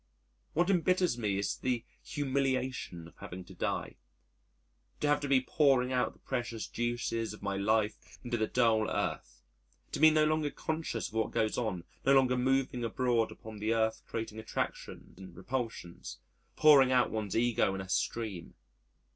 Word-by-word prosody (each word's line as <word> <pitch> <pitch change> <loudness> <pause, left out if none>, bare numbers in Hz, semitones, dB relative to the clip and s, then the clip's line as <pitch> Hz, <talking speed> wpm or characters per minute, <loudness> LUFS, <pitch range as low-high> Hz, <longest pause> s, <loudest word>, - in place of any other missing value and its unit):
What 175 +4 +2
embitters 180 -3 +2
me 105 -5 -1
is 100 0 -1
the 125 -2 -1 0.2
humiliation 130 - -2
of - - -17
having 90 +1 -8
to - - -12
die, - - -3 1.0
to 150 - 0
have 145 0 +3
to 145 - -3
be 135 -2 +4
pouring 130 -2 +3
out 125 -1 +1
the - - -23
precious 120 -4 -3
juices 120 -2 -2
of - - -16
my 100 -1 -1
life 105 +2 0
into 120 -1 -2
the 110 -2 0
dull 115 -3 +2
Earth, - - -3 0.5
to - - -3
be 155 +1 +8
no 155 0 +4
longer 155 -1 +1
conscious 155 -7 -3
of - - -20
what 110 -1 0
goes 110 -1 0
on, 110 -8 -2 0.2
no 135 +1 +5
longer 130 -1 +4
moving 130 -1 +1
abroad 115 -1 +1
upon 110 -1 -10
the 110 +2 +1
Earth 110 0 +1
creating 110 -1 -4
attraction 110 - -5
and 95 -2 -11
repulsions, 115 -5 -5 0.4
pouring 140 -4 +7
out 125 -1 +3
one's 110 -2 -2
ego 115 -4 +2
in 95 - -4
a 95 - -8
stream. 100 -2 -2
120 Hz, 165 wpm, -31 LUFS, 110-135 Hz, 1.0 s, be